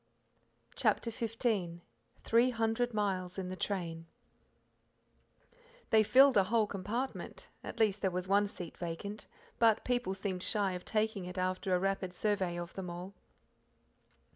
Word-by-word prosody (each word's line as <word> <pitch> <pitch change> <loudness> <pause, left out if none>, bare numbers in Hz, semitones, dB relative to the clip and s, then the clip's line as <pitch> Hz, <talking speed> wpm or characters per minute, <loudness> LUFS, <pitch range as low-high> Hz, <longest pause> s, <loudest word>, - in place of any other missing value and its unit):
CHAPTER 230 +1 +1
XV 220 -7 -1 0.4
Three 235 +2 +4
Hundred 230 +1 0
Miles 190 -4 -1
in 185 -1 -3
the 185 - -4
Train 170 -4 -3 1.8
They 220 - +7
filled 265 +4 +6
a 195 - +5
whole 220 +2 +3
compartment 210 +6 -4
at - - -7
least 210 -2 +3
there 190 - +2
was 180 0 -3
one 200 +1 +4
seat 175 -4 -7
vacant, 180 +5 -5 0.3
but 225 -2 +4
people 245 -6 0
seemed 190 -2 -3
shy 200 0 0
of 180 0 -6
taking 215 -3 0
it 180 +1 -7
after 185 0 0
a - - +2
rapid 195 -1 -1
survey 190 -4 0
of 175 0 -6
them 185 -2 -5
all. 175 +3 -7
195 Hz, 140 wpm, -33 LUFS, 180-220 Hz, 1.8 s, They